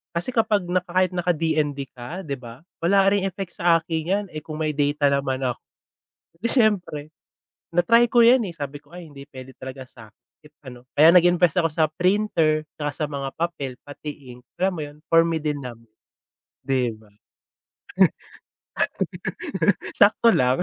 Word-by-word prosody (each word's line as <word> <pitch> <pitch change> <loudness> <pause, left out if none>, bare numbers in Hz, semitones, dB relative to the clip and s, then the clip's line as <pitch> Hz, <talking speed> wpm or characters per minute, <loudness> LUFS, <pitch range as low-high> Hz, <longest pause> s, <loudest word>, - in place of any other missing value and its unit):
Kasi 175 +8 -2
kapag 220 -4 +1
na 180 - +2
kahit 185 +1 +1
naka 180 -1 0
DND 150 -4 -1
ka 130 +10 -8
di 140 -6 -5
ba, 120 +1 -12 0.2
wala 195 +3 +3
ring 200 -1 +1
effect 195 -1 -4
sa 170 -1 +3
akin 160 -1 -3
'yan, 205 +1 0
eh, 155 -1 -8
kung 155 0 -6
may 155 - 0
data 145 -1 +1
naman 135 -1 -1
ako, 125 -2 -1 0.9
siyempre 210 - +1 0.6
na-try 230 +8 +4
ko 240 - +5
'yan, 235 +1 +6
eh, 185 - -5
sabi 145 -3 -6
ko 145 - -24
ay 175 -2 -10
hindi 140 -2 -12
puwede 130 -2 -12
talaga 130 0 -9
sa'kin 110 -4 -15 0.2
kahit 150 0 -21
ano, 125 0 -11
kaya 155 +2 +6
nag-invest 175 -1 +4
ako 165 -2 +3
sa 155 0 +2
printer 170 -2 +1
tsaka 145 -1 -3
sa 150 - -3
mga 140 -2 -4
papel, 155 -6 -2
pati 145 -3 -9
ink, 125 - -19 0.2
alam 190 +1 +2
mo - - -5
'yun 145 0 -11
for 165 0 +5
me 165 -1 -1
din 150 -2 -3
naman, 115 -2 -10 0.8
di 125 -4 0
ba? 110 -1 -21 2.8
Sakto 210 +3 +5
lang. 130 +6 +2
155 Hz, 165 wpm, -23 LUFS, 140-180 Hz, 2.8 s, yan